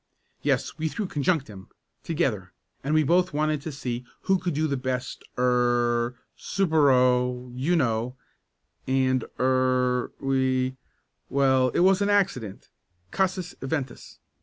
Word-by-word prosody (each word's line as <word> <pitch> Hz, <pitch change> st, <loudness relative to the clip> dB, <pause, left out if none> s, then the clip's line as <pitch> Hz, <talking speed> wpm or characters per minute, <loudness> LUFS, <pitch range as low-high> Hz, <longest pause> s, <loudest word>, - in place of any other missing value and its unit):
"Yes, -, -, -1 dB
we 160 Hz, -, 0 dB
threw 205 Hz, +7 st, -3 dB
conjunctim 140 Hz, -, -2 dB, 0.3 s
together 125 Hz, -, -2 dB, 0.3 s
and 150 Hz, +3 st, 0 dB
we 155 Hz, -, +4 dB
both 175 Hz, +3 st, +2 dB
wanted 150 Hz, 0 st, 0 dB
to 160 Hz, -, -5 dB
see 125 Hz, -3 st, -4 dB, 0.2 s
who 190 Hz, -1 st, +2 dB
could 175 Hz, -4 st, -2 dB
do 155 Hz, +2 st, +1 dB
the 140 Hz, -3 st, 0 dB
best 130 Hz, 0 st, -4 dB
er 120 Hz, -1 st, +2 dB, 0.2 s
supero 125 Hz, -7 st, +2 dB
you 145 Hz, +8 st, +1 dB
know, 120 Hz, -4 st, 0 dB, 0.7 s
and 130 Hz, -1 st, +2 dB, 0.2 s
er 130 Hz, -1 st, +2 dB
we 130 Hz, -1 st, 0 dB, 0.5 s
well, 130 Hz, -2 st, +3 dB
it -, -, +3 dB
was 190 Hz, +2 st, +4 dB
an 200 Hz, -, +2 dB
accident 180 Hz, -, 0 dB, 0.4 s
casus 185 Hz, -2 st, -1 dB
eventus. 135 Hz, -2 st, -4 dB
130 Hz, 125 wpm, -26 LUFS, 125-160 Hz, 0.7 s, we